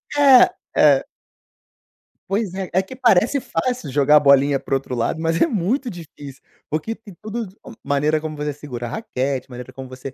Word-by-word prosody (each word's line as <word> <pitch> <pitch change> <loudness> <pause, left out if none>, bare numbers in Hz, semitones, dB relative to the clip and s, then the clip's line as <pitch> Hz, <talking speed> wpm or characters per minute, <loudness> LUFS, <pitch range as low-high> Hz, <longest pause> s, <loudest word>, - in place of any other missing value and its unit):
É, 275 -3 +6 0.2
é. 140 -3 +5 1.3
Pois 200 -2 -1
é. 190 -1 -4
É 185 - +3
que 225 +7 -11
parece 245 +1 +3
fácil 240 - -3
jogar 145 +2 +4
a - - +7
bolinha 140 -1 +4
para - - -5
o - - +5
outro 135 -1 -4
lado, 120 +7 -1
mas 165 0 0
é - - +5
muito 240 - -1
difícil. 145 - -11 0.3
Porque 155 +9 -2
tem 215 -3 -14
tudo 220 +1 -5 0.4
maneira 150 +2 +1
como 155 0 -6
você 150 0 -3
segura 135 -4 -7
a 120 - -5
raquete, 135 - -3
maneira 125 +1 -9
como 130 0 -9
você 130 +1 -9
155 Hz, 185 wpm, -21 LUFS, 135-215 Hz, 1.3 s, a